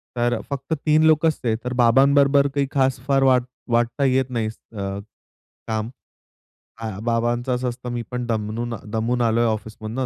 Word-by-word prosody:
तर 120 0 +1
फक्त 140 +3 -3
3 155 +1 +4
लोक 155 0 +4
असते 125 -8 +1
तर 125 0 -3
बाबांबरोबर 140 +3 +4
काही 140 -1 +1
खास 135 -2 +1
फार 135 -1 +3
वाट 130 -2 +4 0.3
वाटता 120 +4 +1
येत 130 0 +2
नाही 115 -3 -1
अ, 100 -3 -6 0.7
काम. 110 0 -2 0.9
अ, 110 - -3
बाबांच 120 +2 0
अस 125 0 0
असतं 125 0 -4
"मी 120 - -2
पण 125 -1 -3
दमूनन 115 +1 -2 0.2
दमून 115 +2 0
आलोय 115 0 +2
ऑफिसमधनं 110 +3 -3
120 Hz, 155 wpm, -22 LUFS, 115-135 Hz, 0.9 s, 3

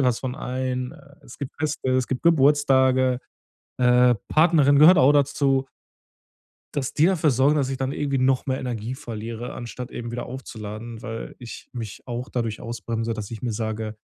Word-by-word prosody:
will - - +2
was 125 -2 +1
von 130 0 -4
einem. 130 -1 -3
Äh, 140 -3 -17
es 120 - -13
gibt 140 -1 -5
Feste, 150 -3 -1
es 130 -1 +2
gibt 130 - -3
Geburtstage, 135 -5 +4 0.6
äh, 125 0 +5
Partnerin 155 -3 +4
gehört 165 +4 +8
auch 130 +3 +6
dazu 140 -1 +2 1.1
Dass 135 -3 -2
die 155 - +3
dafür 165 -5 +3
sorgen, 135 +4 +3
dass 135 -3 +1
ich 135 - -2
dann 130 +1 -2
irgendwie 140 -2 -1
noch 130 0 +2
mehr 130 -1 -1
Energie 120 -1 -4
verliere, 115 -2 -6
anstatt 125 +1 -7
eben 120 -1 -6
wieder 120 0 -4
aufzuladen, 115 -2 -8
weil 115 0 -6
ich 120 -2 -10
mich 115 -4 -6
auch 120 +1 -5
dadurch 115 -4 -3
ausbremse, 115 -1 -3
dass 110 -2 -6
ich 115 -1 -7
mir 120 - -1
sage: 110 0 -3
130 Hz, 180 wpm, -24 LUFS, 115-140 Hz, 1.1 s, gehört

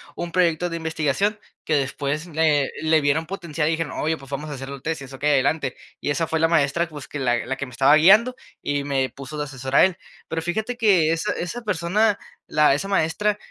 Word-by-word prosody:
un 175 0 -5
proyecto 175 -1 +2
de 170 - -2
investigación 160 +6 -1 0.2
que 155 - +1
después 140 +2 -1
le 155 -4 +2
le 160 0 +3
vieron 145 +3 +1
potencial, 170 -5 -3
y - - +2
dijeron: 165 -1 -2
"Oye, 160 +1 0
pues 135 -2 -14
vamos 145 +2 -4
a - - -5
hacer 135 0 -7
los 140 -1 -8
tesis, 140 -4 -4
okey, 145 +3 -1
adelante". 140 0 +1 0.3
Y - - -2
esa 165 +3 +1
fue 160 0 -1
la 165 - +4
maestra, 165 +1 +2
pues, 145 -4 -9
que 145 - -6
la 120 -3 0
la 135 +2 -2
que 140 - -4
me - - -12
estaba 135 +4 +5
guiando 210 +10 +6 0.3
y 145 0 -1
me 135 -2 0
puso 140 +2 -9
de 150 - -1
asesor 135 -1 -5
a - - +8
él. 190 -2 -1 0.3
Pero 165 0 -3
fíjate 220 +9 -2
que 190 -9 +4
esa 165 0 -1
esa 180 +8 -4
persona, 205 +1 +1 0.3
la 150 -2 +4
esa 150 +8 -2
maestra 200 +3 +1
155 Hz, 220 wpm, -23 LUFS, 140-170 Hz, 0.3 s, a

